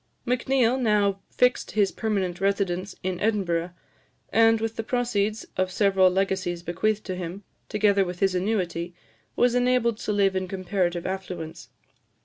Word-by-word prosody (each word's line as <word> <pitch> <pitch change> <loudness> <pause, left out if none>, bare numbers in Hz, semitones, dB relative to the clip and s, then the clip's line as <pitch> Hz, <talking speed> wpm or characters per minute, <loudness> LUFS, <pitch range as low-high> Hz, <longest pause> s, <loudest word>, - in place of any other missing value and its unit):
Macneill 255 0 +2
now 205 -4 +2
fixed 250 0 +1
his 200 -2 +3
permanent 195 -5 -2
residence 195 -1 0
in 185 -1 -2
Edinburgh, 185 -6 0 0.6
and, 225 0 +5
with 225 0 -3
the - - -2
proceeds 220 -3 -1
of 185 0 0
several 195 -1 +4
legacies 190 -2 -1
bequeathed 205 +5 -1
to 185 - -3
him, 180 +2 -6 0.3
together 205 -2 +3
with 180 -1 -5
his 195 -1 +2
annuity, 180 -3 -1 0.4
was 245 0 +3
enabled 245 -2 +2
to - - -2
live 200 -2 +2
in 185 0 -1
comparative 185 -2 -1
affluence. 180 -4 -6
195 Hz, 140 wpm, -25 LUFS, 185-220 Hz, 0.6 s, and